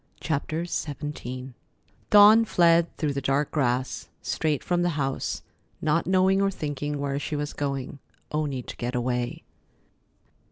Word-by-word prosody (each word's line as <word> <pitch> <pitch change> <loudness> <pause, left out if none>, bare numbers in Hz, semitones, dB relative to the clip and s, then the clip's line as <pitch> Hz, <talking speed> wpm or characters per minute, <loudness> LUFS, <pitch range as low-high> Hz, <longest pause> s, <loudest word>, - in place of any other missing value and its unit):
CHAPTER 155 +2 -2
XVII 135 -5 -5 0.6
Dawn 210 +2 +8
fled 170 -5 +3
through 150 -3 0
the 140 - -2
dark 135 +2 0
grass, 130 -3 -1
straight 155 -3 -1
from 175 -1 +1
the 175 -3 0
house, 135 -2 -2 0.4
not 160 +2 +1
knowing 190 +1 +3
or 195 - +3
thinking 145 -5 -3
where 140 0 -2
she 150 - -3
was 145 0 -3
going, 140 -1 -3 0.3
only 145 -4 -2
to - - -8
get 120 +1 -3
away. 125 0 -2
145 Hz, 135 wpm, -26 LUFS, 135-170 Hz, 0.6 s, Dawn